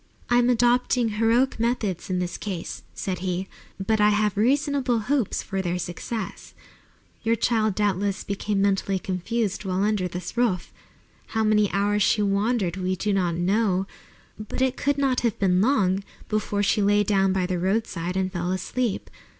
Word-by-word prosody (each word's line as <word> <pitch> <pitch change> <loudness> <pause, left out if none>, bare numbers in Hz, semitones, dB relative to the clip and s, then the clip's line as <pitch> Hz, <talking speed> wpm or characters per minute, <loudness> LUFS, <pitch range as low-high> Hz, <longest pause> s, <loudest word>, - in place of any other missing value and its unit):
"I 240 - +5
am 245 0 +3
adopting 245 0 +3
heroic 230 +4 +2
methods 225 -7 -1
in 185 - 0
this 180 0 -2
case," 185 -5 -5
said 185 -2 -3
he, 185 +1 -2 0.3
"but 215 +2 +1
I 210 - +6
have 210 -1 +1
reasonable 270 +2 +2
hopes 245 +1 0
of 195 -1 -3
their 175 0 -1
success. 190 +5 -5 0.7
Your 225 +1 +2
child 220 -3 +1
doubtless 200 -1 0
became 200 0 -1
mentally 195 -1 +1
confused 195 +4 -2
while 190 0 -1
under 205 -3 +1
this 180 +3 -6
roof. 235 -8 0 0.6
How 220 - +3
many 210 -1 +3
hours 205 +1 +1
she 210 +1 +3
wandered, 200 -2 0
we 185 0 -1
do 205 +3 -1
not 180 -4 +1
know, 190 +1 +1 0.5
but 215 +3 -6
it 260 0 +2
could 285 0 0
not 270 -3 +2
have 235 -4 0
been 185 -2 +2
long 200 -6 +2 0.3
before 210 -1 0
she 205 +1 +2
lay 205 +1 +4
down 195 -2 +2
by 185 -1 +1
the 180 -1 -2
roadside 185 -2 -1
and 190 0 -1
fell 175 0 -2
asleep. 215 +4 -2
205 Hz, 165 wpm, -25 LUFS, 185-230 Hz, 0.7 s, I